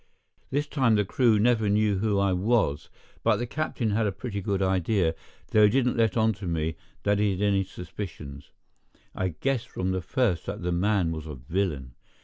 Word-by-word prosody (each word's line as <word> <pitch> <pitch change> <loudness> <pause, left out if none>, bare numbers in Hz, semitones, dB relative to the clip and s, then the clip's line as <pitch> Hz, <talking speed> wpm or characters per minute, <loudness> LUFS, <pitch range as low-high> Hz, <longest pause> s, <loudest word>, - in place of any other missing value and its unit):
This 145 +2 0
time 130 -6 +2
the 105 -1 +2
crew 115 +1 +3
never 110 -1 +2
knew 105 -1 +2
who 105 -1 +1
I 100 -1 +2
was, 90 -6 +1 0.3
but - - +3
the 120 - -2
captain 125 -4 -2
had 110 +1 +1
a - - 0
pretty 100 0 -5
good 100 0 -1
idea, 95 -2 +1 0.4
though 105 -1 +6
he - - +5
didn't 125 +2 +2
let 115 -3 +2
on 110 0 +3
to 95 - -4
me 80 -1 -1 0.3
that 100 0 +2
he 105 0 +3
had 95 - -4
any 100 -1 +2
suspicions. 80 -6 -8 0.6
I 95 - -1
guessed 135 -4 -1
from 95 0 -2
the 95 0 -1
first 105 - 0
that - - -5
the 90 - -1
man 90 -1 +1
was 80 -1 -5
a 75 - -6
villain. 70 -2 -3
100 Hz, 195 wpm, -27 LUFS, 90-110 Hz, 0.6 s, though